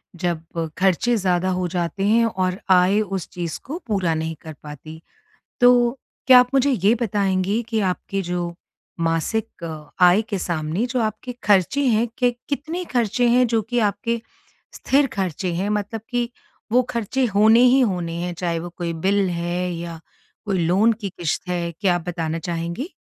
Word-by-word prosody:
जब 165 -2 -3
खर्चे 195 +6 +2
ज़्यादा 185 -1 +1
हो 180 -1 -1
जाते 175 +2 -2
हैं 230 +2 +4
और 185 -3 -1
आय 185 +3 +5
उस 195 -4 -4
चीज़ 170 -3 -4
को 310 +5 -5
पूरा 190 -6 +1
नहीं 160 0 -3
कर 160 -1 -8
पाती। 155 +2 -10 0.6
तो 245 +1 +5 0.3
क्या 255 -1 +9
आप 250 0 +3
मुझे 270 +1 +3
ये 210 -1 +3
बताएंगी 200 0 0
कि 220 -2 0
आपके 195 +2 -3
जो 175 -1 -3 0.5
मासिक 165 +5 -1
अ, 155 -2 -7 0.2
आय 180 +5 +5
के 215 -3 -4
सामने 165 +6 -1
जो 250 0 -1
आपके 215 +3 -3
खर्चे 210 +8 +3
हैं 230 0 +2
के 245 -1 +3 0.2
कितने 315 +5 -3
खर्चे 240 +1 +2
हैं 250 +1 +4
जो 225 -1 +1
कि 245 +3 -1
आपके 230 +3 -3 0.5
स्थिर 275 +1 +2
खर्चे 185 -2 -2
हैं? 190 +4 -1
मतलब 210 +1 -2
कि 240 -1 -1 0.4
वो 250 +1 +5
खर्चे 235 +3 -1
होने 220 +3 +6
ही 255 +2 +6
होने 180 -8 0
हैं 175 0 -3
चाहे 170 -1 -2
वो 175 +1 -6
कोई 170 -2 -2
बिल 200 -1 +3
है 175 +1 -2
या 170 -1 -6 0.5
वो 195 - 0
लोन 190 +6 +3
की 200 - -3
किश्त 175 0 -3
है 170 -1 -1
क्या 185 -4 +2
आप 175 - -2
बताना 165 -1 -2
चाहेंगी? 170 - -4
190 Hz, 170 wpm, -22 LUFS, 170-230 Hz, 0.6 s, क्या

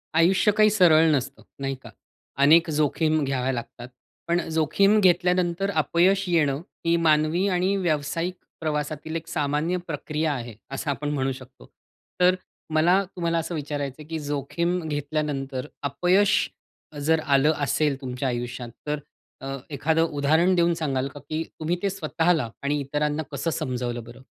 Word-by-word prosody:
आयुष्य 185 +6 +4
काही 215 0 +6
सरळ 165 -6 +5
नसतं 135 0 -4 0.2
नाही 135 0 -2
का. - - -10 0.5
अनेक 160 +4 +6
जोखीम 155 +1 +1
घ्याव्या 135 -1 0
लागतात. 120 0 -7 0.4
पण 170 +1 +2
अ, - - -8
जोखीम 160 +7 +3
घेतल्यानंतर 180 0 +2
अपयश 180 +4 +2
येणं 150 -5 +2 0.2
ही 165 0 +3
मानवी 155 +5 +3
आणि 185 +1 +1
व्यावसायिक 165 0 -1 0.3
प्रवासातील 155 0 -3
एक 165 0 -4
सामान्य 150 +4 0
प्रक्रिया 155 0 -2
आहे 120 -4 -6
असं 135 +2 -4
आपण 145 +1 -3
म्हणू 135 -2 0
शकतो. 130 - -11 0.5
तर 180 +1 +5 0.4
मला 175 +5 +4
तुम्हाला 170 -2 0
असं 165 +1 -2
विचारायचंय, 145 -1 -4
की 160 +1 -4
जोखीम 150 +5 -1
घेतल्यानंतर 145 -2 -3 0.2
अपयश 180 +8 +2 0.6
जर 160 +1 +3
आलं 140 +1 +4
असेल 145 -1 +1
तुमच्या 130 0 -3
आयुष्यात, 120 0 -4 0.2
तर 150 0 -1 0.4
अ, 135 0 -4
एखादं 160 +3 +1 0.2
उदाहरण 160 +6 +3
देऊन 170 -1 +3
सांगाल 140 -5 -1
का, 140 +1 -10
की 155 +3 -4 0.2
तुम्ही 160 +2 0
ते 200 - +1
स्वतःला 165 -6 0
आणि 145 +1 0
इतरांना 150 +2 -1
कसं 140 +4 -2
समजावलं 125 -3 -3
बरं? 120 +3 -13
155 Hz, 145 wpm, -25 LUFS, 140-170 Hz, 0.6 s, काही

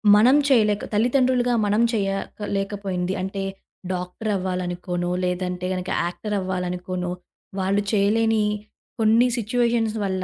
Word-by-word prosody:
మనం 250 +7 +6
చేయలేక 215 -5 +3
తల్లితండులుగా 245 +2 +2
మనం 210 +3 +2
చేయలేకపోయింది, 195 -2 -2
అంటే 195 +1 -3 0.5
డాక్టరు 180 +4 -3
అవ్వాలనుకోనో, 180 -1 -2 0.2
లేదంటే 180 0 -2 0.4
యాక్టర్ 210 +4 -3
అవ్వాలనుకోనో, 180 -1 -3 0.5
వాళ్ళు 195 +2 +1
చేయలేని 215 +2 +3 0.6
కొన్ని 225 +3 +5
సిట్యుయేషన్స్ 230 -1 +1
వల్ల 190 -1 -1
200 Hz, 95 wpm, -23 LUFS, 180-225 Hz, 0.6 s, మనం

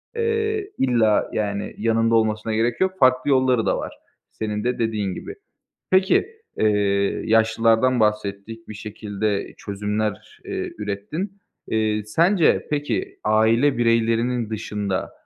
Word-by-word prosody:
eee, 440 -3 -1
illa, 115 -5 +2
yani, 100 -1 -2
yanında 115 +1 +2
olmasına 110 0 +1
gerek 115 +5 0
yok, 190 0 +2
farklı 130 +1 +4
yolları 130 -3 +3
da - - +1
var, - - -5 0.4
senin 105 -1 -4
de 125 +1 -1
dediğin 105 -4 -1
gibi. 405 - -8 0.6
Peki, 190 - +3 0.3
eee, 100 -2 +1
yaşlılardan 115 +2 +3
bahsettik, 105 +1 -2
bir - - -7
şekilde 105 -1 -3
çözümler, 105 +1 -4
eee, - - -4
ürettin. 110 - -5 0.3
Eee, 110 -1 0
sence, 170 - +2
peki, 145 -6 -2
aile 115 +6 +3
bireylerinin 115 0 +1
dışında 105 -3 -3
110 Hz, 120 wpm, -22 LUFS, 105-125 Hz, 0.6 s, farklı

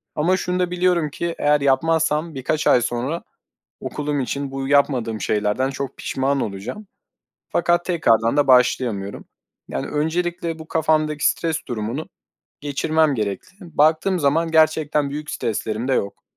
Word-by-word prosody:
ama 180 +5 +2
şunu 180 0 -2
da 180 -1 0
biliyorum 180 -3 +1
ki, 170 +3 -4
eğer 150 0 +3
yapmazsam 160 +2 +1
birkaç 140 +4 -1
ay 125 - +5
sonra 125 +7 -2 0.6
okulum 150 -1 -2
için 140 +1 -3
bu 135 0 -4
yapmadığım 130 -6 +2
şeylerden 105 +5 0
çok 135 0 -5
pişman 135 +1 -1
olacağım 105 - -5 0.6
fakat 175 0 +1
tekrardan 115 -8 +2
da 145 -1 +3
başlayamıyorum. 120 -6 +2 0.4
Yani, - - -3
öncelikle 170 +2 -2
bu 160 - -10
kafamdaki 155 -2 +1
stres 165 -2 -1
durumunu 120 +4 -4 0.5
geçirmem 150 +1 +1
gerekli. 150 - -6
Baktığım 160 +5 +3
zaman 160 +3 +1
gerçekten 155 -2 +2
büyük 150 +1 -5
streslerim 110 +2 -2
de 135 - +2
yok. 100 -5 -2
150 Hz, 135 wpm, -21 LUFS, 130-160 Hz, 0.6 s, ay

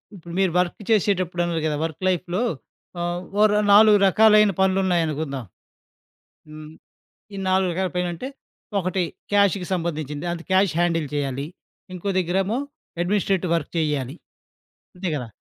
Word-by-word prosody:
ఇప్పుడు 170 -2 -11
మీరు 190 -2 +2
వర్కు 180 +3 -2
చేసేటప్పుడన్నారు 180 -5 +1
కదా! 150 - -1
వర్క్ 165 +2 -7
లైఫ్‌లో 180 +3 -1 0.6
ఆహ్, 175 0 -2 0.2
ఓరొ 210 -1 +4
4 210 0 +7
రకాలైన 210 +1 +5
పనులున్నాయనుకుందాం. 165 -8 0 1.0
హ్మ్. 155 0 -10 0.6
ఈ - - -7
4 190 0 +2
రకాల 185 +2 -1
పనంటే, 180 +5 -2 0.5
ఒకటి 185 0 -1 0.3
క్యాషుకి 200 -3 +2
సంబంధించింది, 155 -3 -3
అది 170 -1 -5
క్యాష్ 190 -2 +3
హ్యాండిల్ 165 -3 +1
చెయ్యాలి. 140 -1 -2 0.5
ఇంకో 185 +2 -4
దగ్గరేమో 190 +5 0 0.4
అడ్మినిస్ట్రేటివ్ 190 -1 0
వర్క్ 165 -3 -3
చేయ్యాలి, 145 -4 -1 0.8
అంతే 180 0 -3
గదా! 125 -5 -4
175 Hz, 120 wpm, -23 LUFS, 160-190 Hz, 1.0 s, 4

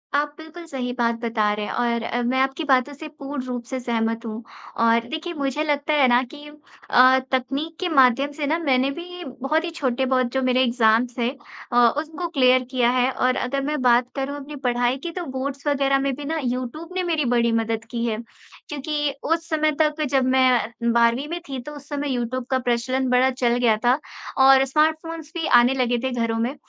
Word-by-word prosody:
आप 290 0 0
बिल्कुल 320 +2 -11
सही 255 -4 -4
बात 235 -2 0
बता 220 -3 0
रहे 210 0 -3
हैं - - -5
और 235 -1 0
अ, 240 +1 -2
मैं 255 +2 0
आपकी 270 +4 0
बातों 275 -1 +2
से 310 +3 -9
पूर्ण 275 -1 -5
रूप 250 -1 -4
से 260 +1 -4
सहमत 230 -1 -2
हूँ। 225 +1 -6 0.4
और 230 0 +3
देखिए, 320 +4 -4
मुझे 280 -1 -2
लगता 295 0 0
है 280 -3 +4
ना 245 0 +4
कि 295 0 -11 0.4
अ, 255 +1 +6
तकनीक 275 +5 -2
के 370 - -1
माध्यम 275 -1 +4
से 290 0 -4
ना 315 +3 +1
मैंने 270 -4 +1
भी 350 +3 -8 0.2
बहुत 310 +5 +1
ही 345 - -3
छोटे-बहुत 260 -2 +1
जो 265 - 0
मेरे 255 0 +2
एग्जाम्स 235 0 +2
थे 240 0 +1 0.4
अ, - - -2 0.2
उसको 320 +3 -4
क्लियर 255 -5 +3
किया 250 -2 +2
है। 255 0 +2
और 255 0 +1
अगर 275 +2 -2
मैं 295 -1 -2
बात 245 0 +3
करूँ 275 +1 -3
अपनी 290 +1 -9
पढ़ाई 245 +1 +1
की, 335 +5 -6
तो 355 0 -5
बोर्ड्स 270 +1 -5
वगैरह 275 -1 +2
में 275 0 -1
भी 290 +2 -8
ना 320 +2 -2
यूट्यूब 255 +6 -4
ने 370 - 0
मेरी 325 -4 0
बड़ी 235 -1 +2
मदद 225 0 -1
की 235 -1 -2
है, 220 -2 -1 0.5
क्योंकि 295 0 -2
उस 330 +1 -1
समय 310 -1 +2
तक 305 0 +1
जब 265 -2 +2
मैं 245 -2 +2
12वीं 235 +4 +2
में 340 +3 -4
थी, 265 - -4
तो 300 - -9
उस 285 0 -12
समय 290 -1 -3
यूट्यूब 245 +1 -3
का 260 - +1
प्रचलन 250 +1 -1
बड़ा 250 +1 +4
चल 245 -2 0
गया 235 -3 +3
था 250 +4 +4 0.5
और 270 0 +7
स्मार्टफ़ोन्स 315 +2 -1
भी 325 - -2
आने 245 +1 +5
लगे 245 -2 +1
थे 260 - -1
घरों 230 -2 -1
में। 245 +5 -1
260 Hz, 210 wpm, -23 LUFS, 245-295 Hz, 0.5 s, और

